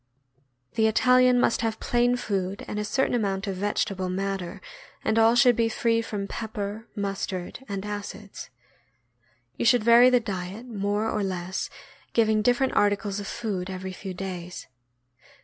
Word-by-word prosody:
The 220 0 +3
Italian 250 +3 +5
must 235 - +2
have 225 -1 -1
plain 245 0 +2
food 195 -4 -3
and 210 - -3
a - - -1
certain 265 +6 0
amount 195 -4 0
of 195 -2 -3
vegetable 195 -1 -1
matter, 190 -1 -3 0.5
and 220 +1 +2
all 225 +1 +5
should 245 0 +6
be 230 0 +2
free 230 0 +1
from 210 -3 -4
pepper, 215 0 -5
mustard, 195 +1 -4
and 200 0 -4
acids. 205 0 -7 1.1
You - - -1
should 235 -1 +5
vary 235 +2 +7
the 250 -1 +4
diet 200 0 -5
more 205 -2 -1
or 215 - -1
less, 185 -1 -3 0.4
giving 220 -2 +3
different 245 +4 +2
articles 205 0 +1
of 200 - -6
food 200 -6 -3
every 190 0 -5
few 190 0 -7
days. 180 -2 -6
210 Hz, 150 wpm, -26 LUFS, 195-230 Hz, 1.1 s, vary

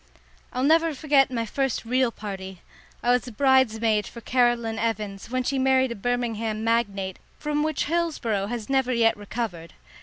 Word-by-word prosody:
I'll 255 - -2
never 325 +2 +3
forget 280 -1 +3
my 230 -3 -2
first 270 +1 -2
real 250 +1 +2
party. 190 -4 -7 0.4
I 245 - +3
was 250 0 +1
bridesmaid 225 -4 +2
for 235 - -9
Caroline 235 -2 +1
Evans, 210 -3 -3
when 255 +1 -1
she 270 +1 -1
married 260 -1 +3
a - - -3
Birmingham 225 -1 -2
magnate, 200 -5 0 0.2
from 295 0 -1
which 310 +1 0
Hillsboro 290 -12 -1
has 230 -1 -4
never 265 -2 +1
yet 230 -2 +3
recovered. 205 -5 -5
235 Hz, 155 wpm, -25 LUFS, 215-265 Hz, 0.4 s, never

